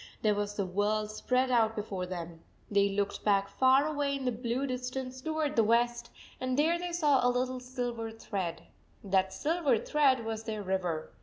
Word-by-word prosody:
There 215 -1 +4
was 205 0 -2
the 200 - -1
world 210 +3 0
spread 255 +4 0
out 225 -2 +3
before 195 -4 -4
them! 170 -2 -6 0.3
They 200 0 +4
looked 200 0 -2
back 200 -1 +3
far 260 +6 +4
away 290 -2 0
in 270 -1 -4
the 250 - +2
blue 240 +3 -2
distance 255 0 -4
toward 310 0 -1
the 230 - +5
west, 240 +2 +1 0.3
and 255 0 -1
there 330 +4 +3
they 355 0 -4
saw 300 -6 +3
a 245 - +4
little 255 +1 -1
silver 245 -2 -4
thread. 200 -6 -4 0.4
That 190 -1 +2
silver 300 - +1
thread 265 -2 +2
was 225 0 -3
their 215 -2 -4
river. 180 -4 -2
235 Hz, 180 wpm, -30 LUFS, 205-260 Hz, 0.4 s, the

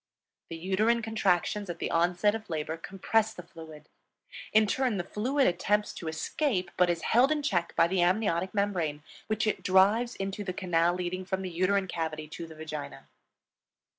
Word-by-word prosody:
The 165 - -6
uterine 215 +7 +1
contractions 205 -2 0
at 175 - -4
the - - -3
onset 175 +5 +2
of 220 -3 -6
labor 160 -1 -2
compress 210 +6 0
the 180 - -8
fluid; 160 -3 -12 0.6
in 215 0 +5
turn 250 0 0
the 175 - -1
fluid 260 +9 0
attempts 205 +4 +1
to 165 - -7
escape 185 - -1
but 180 -1 +3
is 170 -1 -1
held 250 +5 +4
in 300 -1 0
check 175 - 0
by - - +5
the 185 +1 +1
amniotic 185 -1 +1
membrane, 175 -8 -1 0.2
which 215 0 0
it 215 -3 -1
drives 200 +7 +3
into 195 +1 -4
the 185 -2 -4
canal 175 -1 +1
leading 180 +1 -3
from 190 0 -3
the 185 - -4
uterine 190 +3 +1
cavity 155 -3 -4
to 165 +1 -7
the 160 - -12
vagina. 155 -1 -7
185 Hz, 175 wpm, -29 LUFS, 170-210 Hz, 0.6 s, in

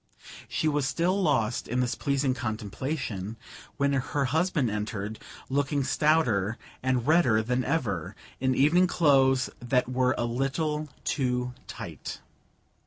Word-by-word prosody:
She 155 - -1
was 145 -2 +1
still 180 +6 +1
lost 120 - +1
in 125 +2 -1
this 125 -1 +1
pleasing 140 -1 0
contemplation 110 -1 -4 0.4
when 140 0 +2
her 140 +1 0
husband 155 - +1
entered, 105 0 -4 0.3
looking 140 +1 0
stouter 120 -9 +2 0.2
and 130 -2 0
redder 140 -9 +4
than 125 +3 0
ever, 120 - -1 0.2
in 130 0 +1
evening 165 +8 +4
clothes 135 -6 +3
that 125 +1 +1
were 130 0 +1
a 120 - 0
little 150 +5 -1
too 125 -3 -1
tight. - - -7
130 Hz, 125 wpm, -28 LUFS, 120-150 Hz, 0.4 s, redder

